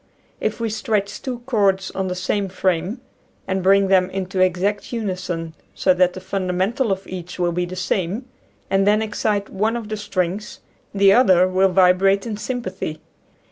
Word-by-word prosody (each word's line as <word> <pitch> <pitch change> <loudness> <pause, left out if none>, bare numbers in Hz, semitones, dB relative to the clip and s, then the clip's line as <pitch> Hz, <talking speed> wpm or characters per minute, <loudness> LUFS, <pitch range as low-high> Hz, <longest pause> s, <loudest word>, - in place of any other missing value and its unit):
If - - -2
we 230 -2 -1
stretch 210 -2 -2
two 250 -2 -5
cords 200 -6 +1
on 190 0 -2
the 180 - -3
same 195 +2 -1
frame 185 +5 -1 0.5
and 190 0 -1
bring 195 +1 +4
them 185 -1 +3
into 190 0 -3
exact 185 +3 +1
uni 215 -6 -2
son, 165 -3 -5 0.2
so 185 - +3
that 180 0 +3
the - - -7
fundamental 190 +5 -1
of 195 0 -2
each 180 -1 -7
will 175 -1 +1
be 175 +1 -1
the 180 +1 -7
same, 185 +5 -2 0.4
and 195 +1 +2
then 210 +1 +4
excite 210 -1 -1
one 220 +4 0
of 220 -3 -7
the 215 - -3
strings, 205 0 -3 0.3
the 195 -1 +5
other 185 -7 +5
will 190 +1 +3
vibrate 190 +1 +4
in 225 -2 -3
sympathy. 205 -9 -4
195 Hz, 175 wpm, -21 LUFS, 185-210 Hz, 0.5 s, the